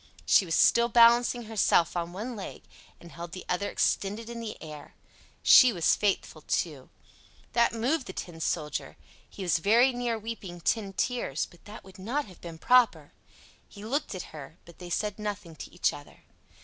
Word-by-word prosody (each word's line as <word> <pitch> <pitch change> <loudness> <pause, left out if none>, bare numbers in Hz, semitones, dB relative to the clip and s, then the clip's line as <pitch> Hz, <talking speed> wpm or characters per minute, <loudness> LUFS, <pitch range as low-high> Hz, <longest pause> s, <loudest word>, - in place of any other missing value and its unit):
She 195 - +5
was 165 - -1
still 235 0 +4
balancing 240 +1 +5
herself 215 -6 +2
on 170 0 -2
one 220 +7 -6
leg 200 - -8 0.4
and 170 - -14
held 170 0 -9
the 185 - -8
other 180 +3 -1
extended 215 +4 -1
in 235 - -6
the 225 -2 -6
air. 150 -2 -11 0.5
She 255 -2 +8
was 175 -6 +2
faithful, 205 -2 -1
too. - - -3 0.6
That 235 0 +3
moved 250 +5 -1
the 185 - -7
Tin 170 -3 -7
Soldier: 150 -2 -3 0.3
he 195 - -8
was 170 -3 +1
very 235 +9 +4
near 240 -2 -2
weeping 210 -5 -7
tin 200 +3 -1
tears, 235 - -1
but 175 - -21
that 210 +1 -11
would 190 0 -15
not 255 +10 -2
have 185 - -16
been 165 -2 -9
proper. 250 +7 +3 0.6
He 205 0 -11
looked 275 -1 -2
at 185 - -8
her, 155 +1 -10
but 170 - -16
they 180 -1 -9
said 210 +3 -2
nothing 205 -5 -5
to - - -9
each 175 - 0
other. 145 - -13
205 Hz, 180 wpm, -28 LUFS, 175-235 Hz, 0.6 s, She